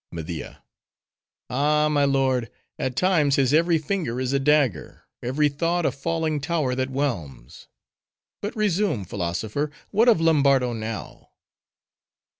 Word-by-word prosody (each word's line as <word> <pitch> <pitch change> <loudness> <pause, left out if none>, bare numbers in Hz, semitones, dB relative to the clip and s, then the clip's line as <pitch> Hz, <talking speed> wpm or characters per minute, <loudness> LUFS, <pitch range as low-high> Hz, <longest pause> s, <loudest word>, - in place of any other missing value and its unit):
MEDIA.—Ay, 130 - -4
my 145 -1 +3
lord; 130 -4 +1 0.3
at 130 -2 -2
times, 160 -7 +3
his 135 0 +2
every 165 +1 +4
finger 155 -6 -2
is 130 +1 -1
a 140 - +2
dagger: 135 - +1 0.2
every 135 +5 +1
thought 165 +4 -1
a - - +2
falling 160 +1 -2
tower 150 -4 -1
that 130 +1 -1
whelms! 85 - -4 0.7
But 205 +5 -4
resume, 205 - 0
philosopher—what 110 - -1
of 220 - +4
Lombardo 140 -6 +3
now? 110 -1 -6
140 Hz, 115 wpm, -24 LUFS, 125-160 Hz, 0.7 s, every